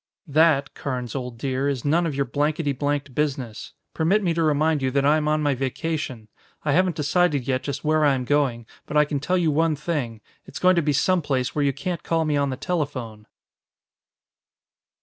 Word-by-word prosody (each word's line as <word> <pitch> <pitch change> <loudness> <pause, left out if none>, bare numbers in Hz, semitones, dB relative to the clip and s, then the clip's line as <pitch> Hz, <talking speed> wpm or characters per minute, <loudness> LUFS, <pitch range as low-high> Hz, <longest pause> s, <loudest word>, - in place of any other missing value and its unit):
"That, 150 -2 +3
Carnes, 125 -3 -4
old 125 -3 -5
dear, 135 +2 -1
is 135 -2 -3
none 165 +4 +2
of 150 - -3
your 140 0 0
blankety 145 +3 0
blanked 140 0 -2
business. 130 -6 -3 0.2
Permit 190 +6 +2
me 175 -3 +1
to 165 - -1
remind 155 -1 +2
you 130 - +1
that 140 +1 +1
I 150 +2 +5
am 150 -1 -1
on 155 0 +1
my 145 -1 +2
vacation. 135 -2 -3 0.4
I 150 - +2
haven't 180 +2 +2
decided 150 -3 +1
yet 130 -1 0
just 140 -1 -5
where 155 0 +2
I 145 -2 +4
am 125 -1 -3
going, 130 -4 +1 0.2
but 150 - -1
I 150 - +6
can 145 -1 -2
tell 180 +6 0
you 165 -3 +2
one 160 +1 +2
thing. 140 -8 -3 0.3
It's - - -8
going 185 0 +4
to 170 - +3
be 150 -1 +1
some 185 +5 +2
place 130 -4 -1
where 150 - 0
you 140 - +3
can't 175 +4 -4
call 165 -1 0
me 150 -1 0
on 140 -1 +1
the 130 - -4
telephone." 130 - -4
145 Hz, 210 wpm, -24 LUFS, 135-160 Hz, 0.4 s, I